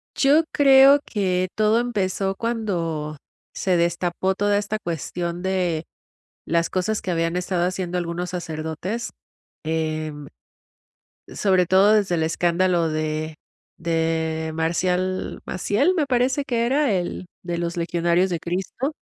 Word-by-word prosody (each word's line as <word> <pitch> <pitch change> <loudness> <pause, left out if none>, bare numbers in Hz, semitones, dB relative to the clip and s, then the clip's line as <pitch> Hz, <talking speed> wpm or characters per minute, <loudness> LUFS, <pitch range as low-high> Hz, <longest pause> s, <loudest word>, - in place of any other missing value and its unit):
Yo 295 +4 +4
creo 275 0 +7
que, 185 -3 0
todo 215 +2 +3
empezó, 195 -5 -1
cuando 170 -10 -2 0.4
se 185 -2 +1
destapó 175 +2 0
toda 205 0 +2
esta 210 +1 -2
cuestión 170 +1 -3
de 180 -4 0 0.6
las 170 +1 +1
cosas 190 +4 -1
que 185 - -3
habían 165 0 0
estado 180 -1 0
haciendo 180 -1 -2
algunos 175 +1 -3
sacerdotes. 170 +5 -4 0.5
Em, 155 -2 -2 1.0
sobre 185 -3 +2
todo, 195 +3 +5
desde 200 -5 +2
el 160 - 0
escándalo 170 +1 +1
de 155 0 -2 0.4
de 160 -1 -1
Marcial 180 +3 -1
Maciel, 265 - +1
me 305 -4 +1
parece 260 +2 +1
que 235 -1 0
era 270 -2 +2
el 180 0 -2 0.2
de, 175 -1 -3
¿los 170 0 -2
legionarios 170 +2 +1
de 170 - -2
Cristo? 190 - -3
180 Hz, 125 wpm, -23 LUFS, 165-205 Hz, 1.0 s, creo